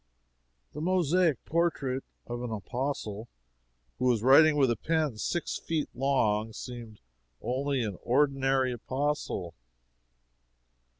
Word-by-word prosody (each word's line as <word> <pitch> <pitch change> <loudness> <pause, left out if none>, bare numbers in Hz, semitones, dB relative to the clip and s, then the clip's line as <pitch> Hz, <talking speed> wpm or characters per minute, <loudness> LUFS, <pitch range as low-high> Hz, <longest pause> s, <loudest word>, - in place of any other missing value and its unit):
The 150 - -6
mosaic 175 -4 +2
portrait 150 -6 0 0.2
of 120 0 -5
an 125 - -4
Apostle 110 -1 -4 0.7
who 125 - 0
was 120 -4 +2
writing 150 +4 +7
with 135 -4 +4
a - - +1
pen 155 -1 0
six 175 +8 -2
feet 160 -3 -2
long 115 -5 +1
seemed 120 -4 -8 0.4
only 135 +1 -1
an 100 -5 -4
ordinary 135 0 +2
Apostle. 130 - -2
130 Hz, 110 wpm, -29 LUFS, 120-150 Hz, 0.7 s, writing